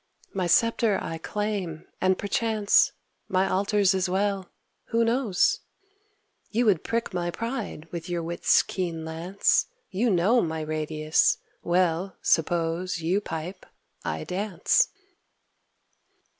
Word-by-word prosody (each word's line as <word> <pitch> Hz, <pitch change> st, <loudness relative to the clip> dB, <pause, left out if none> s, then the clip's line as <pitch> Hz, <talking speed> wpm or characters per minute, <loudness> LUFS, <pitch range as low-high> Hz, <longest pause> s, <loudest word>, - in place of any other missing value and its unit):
My 185 Hz, -2 st, -1 dB
sceptre 230 Hz, +2 st, +3 dB
I 165 Hz, -, -5 dB
claim, 200 Hz, -5 st, -3 dB, 0.2 s
and, 185 Hz, 0 st, +3 dB
perchance, 215 Hz, 0 st, +2 dB, 0.4 s
My 190 Hz, +1 st, +2 dB
altars 200 Hz, 0 st, +2 dB
as 190 Hz, -1 st, 0 dB
well, 195 Hz, 0 st, 0 dB, 0.4 s
who 230 Hz, 0 st, +1 dB
knows? 230 Hz, -5 st, +2 dB, 0.9 s
You 235 Hz, +2 st, +1 dB
would 195 Hz, -7 st, +3 dB
prick 230 Hz, -3 st, -2 dB
my 175 Hz, -1 st, -1 dB
pride 230 Hz, -, -4 dB
with 170 Hz, 0 st, -6 dB
your 175 Hz, -1 st, -2 dB
wit's 170 Hz, +1 st, +3 dB
keen 170 Hz, -4 st, -3 dB
lance, 170 Hz, +5 st, +1 dB, 0.2 s
You 225 Hz, +6 st, +1 dB
know 205 Hz, +6 st, +4 dB
my 160 Hz, -1 st, -2 dB
radius. 155 Hz, 0 st, +1 dB, 0.2 s
Well, 180 Hz, +1 st, +1 dB
suppose 170 Hz, +2 st, +1 dB
You 180 Hz, +5 st, +1 dB
pipe, 180 Hz, +3 st, -6 dB, 0.4 s
I 80 Hz, 0 st, -3 dB
dance. 195 Hz, +1 st, +1 dB
185 Hz, 115 wpm, -26 LUFS, 165-205 Hz, 0.9 s, know